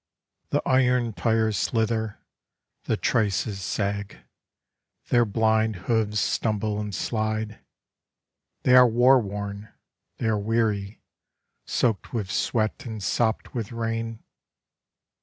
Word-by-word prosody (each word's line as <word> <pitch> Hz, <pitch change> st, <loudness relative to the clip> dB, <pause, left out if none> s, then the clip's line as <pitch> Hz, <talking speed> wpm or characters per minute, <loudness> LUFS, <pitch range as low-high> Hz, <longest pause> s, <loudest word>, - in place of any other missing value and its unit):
The -, -, 0 dB
iron 125 Hz, -3 st, +2 dB
tires 110 Hz, -1 st, +1 dB
slither, 110 Hz, -2 st, 0 dB, 0.7 s
the -, -, 0 dB
traces 105 Hz, -2 st, 0 dB
sag; 100 Hz, +1 st, -2 dB, 0.9 s
their 120 Hz, -1 st, +4 dB
blind 110 Hz, 0 st, +2 dB
hooves 110 Hz, -2 st, +1 dB
stumble 105 Hz, 0 st, 0 dB
and 105 Hz, -2 st, -4 dB
slide; 110 Hz, -1 st, -2 dB, 1.0 s
They 125 Hz, -, +5 dB
are 125 Hz, -1 st, +9 dB
war 125 Hz, +3 st, +5 dB
worn, 100 Hz, 0 st, -6 dB, 0.5 s
they -, -, -3 dB
are 110 Hz, -2 st, +1 dB
weary, 105 Hz, -1 st, -1 dB, 0.6 s
soaked 115 Hz, -5 st, 0 dB
with 100 Hz, -4 st, -2 dB
sweat 110 Hz, +1 st, 0 dB
and 110 Hz, -3 st, -6 dB
sopped 110 Hz, 0 st, 0 dB
with 115 Hz, -3 st, -4 dB
rain. 115 Hz, -1 st, -3 dB
110 Hz, 105 wpm, -25 LUFS, 105-115 Hz, 1.0 s, are